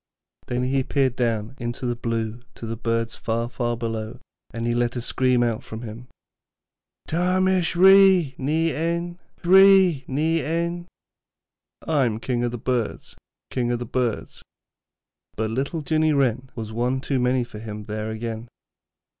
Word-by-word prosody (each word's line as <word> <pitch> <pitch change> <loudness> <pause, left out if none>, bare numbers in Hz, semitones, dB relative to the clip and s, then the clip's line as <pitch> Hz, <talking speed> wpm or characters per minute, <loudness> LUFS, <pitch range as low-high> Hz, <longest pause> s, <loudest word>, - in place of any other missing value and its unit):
Then 125 +1 -1
he 135 +1 +1
peered 130 -1 +1
down 115 -1 -1
into 120 +1 -4
the 120 -1 0
blue 115 -1 -3
to - - -8
the 115 0 -3
birds 115 0 -1
far, 115 +1 -2
far 120 -1 -2
below, 110 -2 -4 0.3
and 115 0 -4
he 120 - +1
let 120 +1 0
a - - -1
scream 125 0 +2
out 115 -2 -2
of 110 +2 -6
him: 115 +2 -8 1.0
'Ta 180 +3 +1
mish 185 -2 +2
Ree 190 -4 +6
ny 160 +4 +1
Ein, 170 +2 -2 0.2
Ree 190 -4 +6
ny 155 +3 0
Ein.' 170 +3 -2 1.0
'I 150 -5 +3
am 110 -2 -1
King 120 0 -1
of 120 - +1
the 120 - -5
Birds, 120 -1 -3 0.4
King 120 -1 0
of 120 - 0
the 120 - -5
Birds.' 120 -1 -2 1.0
But 110 0 -1
little 140 +6 -2
Jinny 155 +1 +2
Wren 130 -2 +1
was 110 -2 -6
one 125 +3 0
too 135 0 -1
many 125 0 +2
for 110 -3 -10
him 105 -1 -7
there 110 +1 -4
again. 110 +1 -5
125 Hz, 160 wpm, -24 LUFS, 115-155 Hz, 1.0 s, Ree